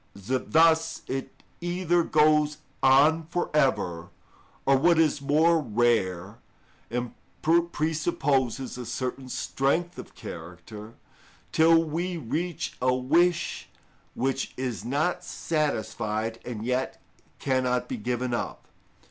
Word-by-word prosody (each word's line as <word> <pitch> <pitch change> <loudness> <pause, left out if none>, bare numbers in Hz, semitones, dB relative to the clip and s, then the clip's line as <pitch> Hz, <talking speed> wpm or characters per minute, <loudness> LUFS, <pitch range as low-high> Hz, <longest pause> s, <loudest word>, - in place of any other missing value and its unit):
1095. 115 +7 -3
Thus 165 0 +4
it 135 0 -6 0.2
either 175 0 +1
goes 150 -1 +3 0.2
on 150 +5 +5
for 175 +1 -2
ever, 90 - +1 0.6
or, 135 - +5
what 170 +5 +4
is 155 -3 +2
more 160 +4 +3
rare 110 - 0 0.5
and 120 +1 -3 0.6
presupposes 140 -5 -1
a 125 - -5
certain 130 +2 -4
strength 160 +8 -1
of - - -10
character, 90 +6 -9 0.6
till 165 +1 +5
we 170 +3 -3
reach 165 +5 -3
a 125 0 +3
wish 165 +6 +1 0.5
which 135 +1 -2
is 125 -7 -3
not 145 +9 -1
satisfied 115 -7 -2
and 115 -3 -6
yet 125 +1 -1 0.4
cannot 130 -2 0
be 260 - -4
given 125 - -2
up. 120 - -4
135 Hz, 110 wpm, -27 LUFS, 120-160 Hz, 0.6 s, on